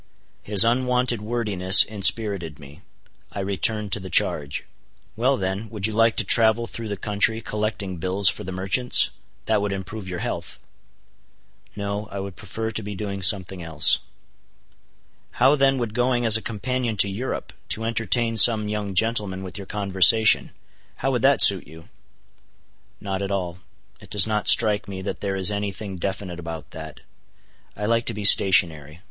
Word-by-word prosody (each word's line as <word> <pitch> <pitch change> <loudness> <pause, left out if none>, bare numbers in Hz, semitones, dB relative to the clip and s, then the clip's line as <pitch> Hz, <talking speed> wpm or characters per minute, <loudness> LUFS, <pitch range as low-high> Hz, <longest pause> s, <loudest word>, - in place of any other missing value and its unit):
His 100 -2 +4
unwonted 125 -1 0
wordiness 105 -4 +3
inspirited 100 -6 0
me. 70 -1 -16 0.5
I - - -8
returned 100 +2 -2
to - - -1
the 95 -1 -10
charge. 70 -3 0 0.5
"Well 130 +4 0
then, 95 +3 -5
would 105 -4 -3
you 110 - -2
like 115 +1 +1
to - - +1
travel 115 0 +3
through 115 -1 -8
the 100 -1 -5
country 105 +3 -1
collecting 105 -4 -5
bills 95 +3 -1
for 95 - 0
the 95 - -8
merchants? 95 +7 +2 0.3
That 110 -2 0
would 100 -1 -3
improve 100 +1 -8
your 90 -1 -6
health." - - -6 1.2
"No, 100 0 -5
I 100 - -6
would 95 -1 -8
prefer 110 0 -7
to 110 - -5
be 105 -1 -8
doing 100 -1 -6
something 95 -2 +2
else." 80 -2 +4 1.3
"How 135 +4 +2
then 135 -1 +1
would 115 -4 -5
going 120 0 -1
as 110 -1 +6
a 110 - +2
companion 115 +1 -4
to 100 - +3
Europe, 105 +7 -6 0.2
to 110 - -2
entertain 115 0 -1
some 110 0 +6
young 105 -2 -5
gentleman 105 -3 -1
with 95 +1 -8
your 100 - -10
conversation,—how 105 +2 +1
would - - -2
that - - +4
suit - - +5
you?" 80 +2 -16 1.1
"Not 95 -1 -5
at 100 - -4
all. 90 -3 -5 0.4
It - - -17
does 105 -3 +4
not 105 -1 -3
strike 105 -3 +4
me 95 -1 -8
that 100 - -6
there 100 -1 -4
is 95 0 +3
any 100 -1 -4
thing 95 -1 -9
definite 95 -1 -6
about 80 -2 -9
that. 80 -1 -11 0.8
I 105 - -5
like 115 +1 -1
to - - -3
be 105 -1 -5
stationary. 80 -6 +5
105 Hz, 165 wpm, -21 LUFS, 95-110 Hz, 1.3 s, as